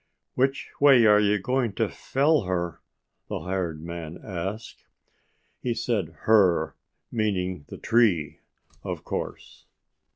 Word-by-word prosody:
"Which 135 +2 0
way 135 -5 +7
are 105 -1 +7
you 105 0 +3
going 120 +2 0
to - - 0
fell 145 -2 +1
her?" 85 -2 -2 0.5
the - - -4
hired 85 -3 -3
man 85 -1 -6
asked. 95 +3 -6 0.7
He 120 -2 -1
said 105 -8 -2
HER, 95 -7 +3 0.4
meaning 95 -8 -1
the - - -9
TREE, 105 -10 +2 0.4
of - - -5
course. - - -6
100 Hz, 120 wpm, -26 LUFS, 85-115 Hz, 0.7 s, way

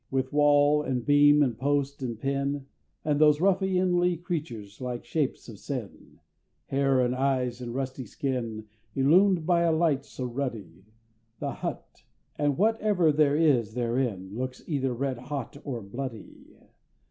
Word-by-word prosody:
With 135 +1 -2
wall, 145 0 +4
and 130 -4 -2
beam, 145 0 +6
and 125 -5 0
post, 140 +2 -1
and 120 -4 -4
pin, 140 +1 -2 0.4
And 150 -1 +1
those 150 -1 +5
ruffianly 185 -2 +2
creatures, 140 - -5
like 125 -1 -4
Shapes 150 -5 -2
of 110 -5 -10
Sin, 125 -8 -7 0.5
Hair, 135 -1 +2
and 125 0 +1
eyes, 130 -2 0
and 120 -1 -5
rusty 130 -1 -4
skin, 115 -4 -3 0.3
Illumed 170 +5 +4
by 175 0 +3
a 170 -1 +3
light 160 -4 +2
so 130 -2 -7
ruddy 115 -9 -5 0.5
The - - -3
Hut, - - -7 0.3
and 145 -2 0
whatever 210 -5 +2
there 145 -1 +3
is 130 -9 +2
therein, 115 -6 -1
Looks 130 +3 -5
either 135 -5 -1
red 130 0 -2
hot 140 +1 -6
or 120 -6 -5
bloody! 120 +2 -8
135 Hz, 145 wpm, -27 LUFS, 125-150 Hz, 0.5 s, beam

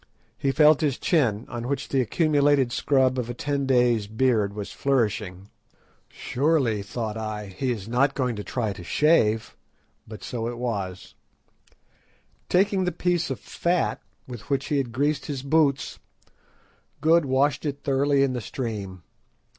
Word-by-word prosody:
He 135 - 0
felt 150 +1 +5
his 145 -4 0
chin, 120 - +1
on 120 0 -5
which 140 0 -3
the 135 - +2
accumulated 145 -1 +2
scrub 130 -1 +2
of 120 -1 -3
a 120 - -4
ten 140 0 -2
days' 120 -5 +3
beard 110 -3 +1
was 105 -2 -6
flourishing. 105 -7 -1 0.6
"Surely," 135 -6 0
thought 110 +2 -4
I, 105 -3 -5
"he 130 +6 -2
is 105 -4 -5
not 135 +4 +1
going 125 -3 -1
to 105 - -5
try 110 -4 -2
to 95 -2 -10
shave." 115 - +2 0.5
But 110 -1 -10
so 115 -2 -4
it 120 0 -5
was. 100 -7 -4 1.4
Taking 190 +1 +2
the 180 - 0
piece 175 -1 0
of 135 - -4
fat 175 0 -1 0.3
with 120 -1 -9
which 140 -1 -1
he 145 - +1
had 125 -4 -3
greased 145 +4 -1
his 135 -3 -4
boots, 140 -2 +1 1.0
Good 160 +2 +4
washed 140 +2 +1
it 145 -2 -4
thoroughly 140 0 +2
in 135 -2 +1
the 125 - -3
stream. 100 -6 -5
130 Hz, 155 wpm, -25 LUFS, 110-145 Hz, 1.4 s, felt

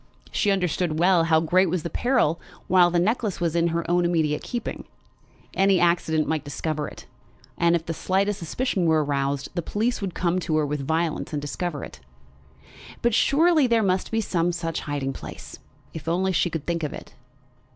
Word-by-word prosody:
She 205 - +1
understood 180 -4 0
well 175 0 +4
how 160 -1 +4
great 180 +3 +3
was 175 -1 -1
the 170 - -3
peril 240 - +1 0.2
while 180 -1 +5
the 175 - 0
necklace 210 +1 0
was 170 -1 -1
in 170 0 +3
her 170 0 -1
own 175 0 +2
immediate 160 -3 +1
keeping. 240 -2 -5 0.7
Any 195 -1 +3
accident 170 -3 +2
might 160 -2 -1
discover 150 +1 -3
it, - - -11 0.5
and 170 0 +3
if 165 -1 -2
the 165 - -3
slightest 195 +4 0
suspicion 185 +1 -1
were 160 -1 +3
aroused, 140 -1 -1
the 175 - -1
police 220 +7 -1
would 190 -4 -4
come 175 0 0
upon 160 -3 -1
her 155 -1 +2
with 145 -1 -3
violence 160 0 -1
and 150 - -1
discover 145 +1 -4
it. - - -10 1.0
But 235 -1 +2
surely 310 +4 +4
there 230 -2 +3
must 185 -1 0
be 225 0 0
some 175 -4 0
such 165 -1 -3
hiding 140 -2 -3
place, - - -9 0.3
if 160 0 -8
only 185 +3 +1
she 175 0 +1
could 160 -3 -5
think 170 -1 -1
of 150 - -3
it! - - -10
170 Hz, 190 wpm, -24 LUFS, 160-190 Hz, 1.0 s, while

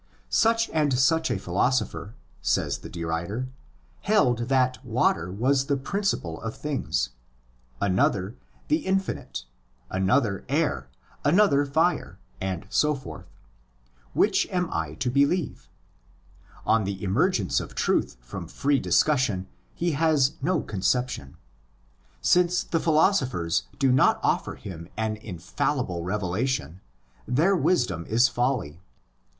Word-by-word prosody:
Such 230 0 +3
and 150 -5 +2
such 160 +5 +3
& - - 0
philosopher 105 +3 -1 0.3
(says - - 0
the - - -9
derider) 85 +9 -3 0.5
held 125 - +2
that 130 -1 +2
water 110 -8 +1
was 130 +7 +1
the 140 - +1
principle 135 - -2
of 115 0 -5
things; 95 - -2 0.7
another 95 +2 +1 0.3
"the 310 - +3
infinite,' 190 -8 -2 0.5
another 95 +2 +1
alr, 140 - 0 0.4
another 145 -3 +4
fire, 160 +5 +1 0.2
and 95 -1 -3
so 150 +8 +2
forth: 80 - -9 0.9
which - - +3
am 180 -2 -1
I 80 -2 -2
to 125 +9 -1
believe 140 +5 0 1.0
ὃ 115 - +4
Of 105 - -2
the 100 +1 -4
emergence 105 - +1
of - - -8
truth - - 0
from 60 - -7
free 140 0 +1
discussion 125 -11 +2 0.3
he 170 0 0
has 150 -3 +3
no 165 +2 +1
conception. 110 - -1 0.8
Since 180 0 +3
the 165 - -1
philosophers 130 - +2
do 135 -2 +3
not 130 - +4
offer - - 0
him 85 -3 -9
an 110 -1 -1
infallible 90 - -3
revelation, 95 - -2 0.5
their 155 - +3
wisdom 120 - +1
is 120 +3 +4
folly. 120 - -1
125 Hz, 120 wpm, -26 LUFS, 95-150 Hz, 1.0 s, another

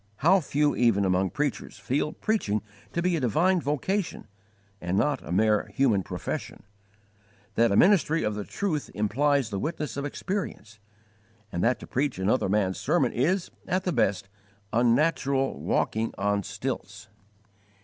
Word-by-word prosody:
How 190 +3 +6
few 150 -2 +1
even 115 -5 +3
among 95 0 +2
preachers 145 -6 -3
feel 130 +8 -1
preaching 110 - -1 0.3
to 170 - -2
be 180 -1 +2
a - - 0
divine 170 - +2
vocation 165 +7 -2 0.6
and 90 +2 -1
not 145 +3 +1
a - - -9
mere 105 +3 +2
human 125 -8 +3
profession; - - -5 0.9
that 115 +1 +3
a - - +2
ministry 165 - +4
of 105 -1 0
the 105 0 -4
truth 160 - -3
implies 130 +4 +1
the 100 - -2
witness 150 - -3
of 140 - -2
experience, 145 - -5 0.7
and 85 - -2
that 125 +1 +2
to - - -7
preach 140 -2 -1
another 95 +3 +1
man's 95 -2 +1
sermon - - +2
is, 170 +9 0 0.2
at 185 +1 0
the 180 - -1
best, 100 -7 +1 0.5
unnatural 135 +3 +2
walking 110 +1 0
on 100 0 +1
stilts! - - -5
130 Hz, 150 wpm, -27 LUFS, 105-155 Hz, 0.9 s, How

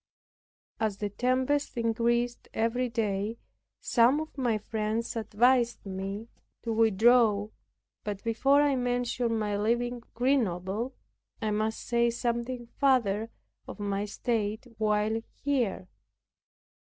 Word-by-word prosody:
As 215 -3 0
the 205 -1 -3
tempest 255 +5 0
increased 235 +1 0
every 240 +3 0
day, 215 -1 -1 0.4
some 245 +4 +4
of 315 0 -6
my 245 -5 +1
friends 220 +2 -2
advised 235 +2 +2
me 195 +3 -5 0.4
to 230 - -1
withdraw, 220 -1 +4 0.5
but 205 -2 -4
before 270 +6 +3
I 285 -2 +3
mention 245 -2 0
my 210 -1 -1
leaving 240 +3 0
Grenoble, 230 -2 0 0.4
I 215 -2 -1
must 215 +1 -1
say 235 0 +2
something 240 +1 -2
farther 230 -4 +1 0.4
of - - -8
my 200 0 -1
state 215 0 -2
while 215 +1 +1 0.2
here. 245 -10 0
230 Hz, 110 wpm, -29 LUFS, 210-245 Hz, 0.5 s, some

